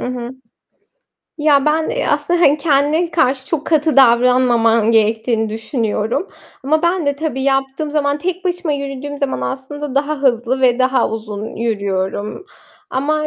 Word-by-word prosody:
Hı - - -4
hı. 240 +1 -6 1.1
Ya, 290 -2 +3
ben, 315 +1 +1
eee, - - -2 0.2
hani, 340 -4 +4
kendine 300 +3 +1
karşı 265 -4 0
çok 315 -2 -3
katı 310 -2 +1
davranmaman 235 -3 +4
gerektiğini 225 0 +1
düşünüyorum. 225 - -2 0.3
Ama 310 +4 +1
ben 345 -2 0
de 285 0 0
tabii 295 -3 -3
yaptığım 270 +2 -1
zaman, 285 -1 0
tek 365 +2 -4
başıma 355 -3 -1
yürüdüğüm 280 0 -5
zaman 280 -2 -2
aslında 270 +1 -5
daha 285 +1 -1
hızlı 255 0 +1
ve 250 -1 +3
daha 255 -1 +2
uzun 215 -1 -5
yürüyorum. 205 - -3 0.4
Ama 305 +3 -1
275 Hz, 140 wpm, -17 LUFS, 235-305 Hz, 1.1 s, hani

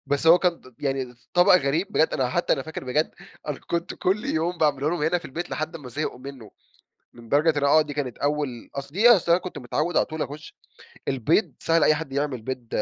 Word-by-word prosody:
بس 145 +3 0
هو 170 +2 +8
كان 175 -1 +1
ط 130 -2 -18
يعني 135 -2 -1
ط 125 0 -15
ط - - -31
طبق 175 +1 +6
غريب 160 +5 0
بجد، 160 - +3
أنا 130 -3 0
حتى 175 +7 +1
أنا - - -2
فاكر 160 -2 -7
بجد، 145 +5 0 0.4
أنا 145 -3 -3
كنت 170 +1 -3
كل 195 +3 -1
يوم 170 +3 -1
باعمله 150 -2 +1
لهم 170 -1 -2
هنا 165 +3 +2
في 175 - -9
البيت 170 +6 -5
لحد 155 +2 -4
أمَّا 145 -6 -9
زهقوا 145 -1 -4
منه. 130 -5 -10 0.6
لدرجة 145 +8 +1
إن - - -2
آه، 145 +2 +5
دي 150 -1 -5
كانت 135 -5 -4
أول 145 -5 -2
أصل 140 0 -6
دي 220 +7 +5
أصل 185 -7 +5
أنا 175 +2 +4
كنت 185 - -7
متعود 150 +7 -1
على - - +3
طول 155 0 -6
أخش 150 +3 -6 0.5
البيض 140 - +1
سهل 165 -1 +2
أي 155 - +5
حد 150 -3 -6
يعمل 140 -3 -2
بيض 125 0 -6
150 Hz, 230 wpm, -24 LUFS, 135-165 Hz, 0.6 s, هو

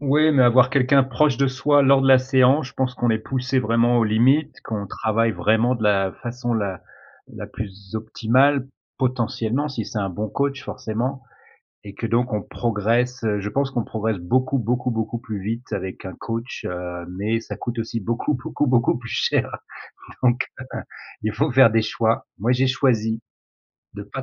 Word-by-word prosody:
Oui, 150 +2 +3
mais 130 -3 +5
avoir 125 +1 +5
quelqu'un 135 0 +4
proche 135 0 +1
de 140 - +2
soi 140 +2 +2
lors 135 0 +5
de 135 - +3
la 130 -1 +8
séance, 130 +2 +3
je - - -15
pense 130 -1 -1
qu'on 120 -2 0
est 110 - +1
poussé 130 +3 -1
vraiment 115 +1 +2
aux 115 - +3
limites, 125 +8 +2
qu'on 105 -3 -4
travaille 110 +4 0
vraiment 115 +5 +2
de 115 - -5
la 95 -2 +2
façon 120 0 -3
la 100 -5 -2 0.5
la - - -8
plus 100 0 -9
optimale, 130 +5 +2 0.3
potentiellement, 125 +1 -1
si 115 -6 -4
c'est 110 - -4
un 100 -2 -1
bon 105 +4 -4
coach 140 +2 -2
forcément 125 +5 -4 0.6
et 100 -1 -9
que 115 - -4
donc 120 +1 0
on 105 - 0
progresse, 120 +3 -1
je 100 +1 -3
pense 135 +2 0
qu'on 120 -4 -2
progresse 110 -2 -2
beaucoup, 130 +10 0
beaucoup, 125 +2 -1
beaucoup 115 0 -2
plus 110 -4 -6
vite 115 +5 -5
avec 95 -2 -5
un 95 - -7
coach, 115 +2 -5
heu, 90 -1 -5
mais 105 +5 -1
ça - - -7
coûte 120 0 -5
aussi 115 0 -3
beaucoup, 120 +8 -1
beaucoup, 130 +3 -2
beaucoup 120 -2 +2
plus 115 -1 -9
cher, - - 0 0.7
donc 120 0 +2
heu, 130 - -7 0.4
il 110 0 -1
faut 140 +6 0
faire 130 -3 +7
des 110 0 +2
choix. 110 +1 0
Moi, 115 +5 0
j'ai 130 +1 +2
choisi 115 -4 +1 0.7
de 100 - -6
pas 105 +6 -7
120 Hz, 185 wpm, -22 LUFS, 110-130 Hz, 0.7 s, la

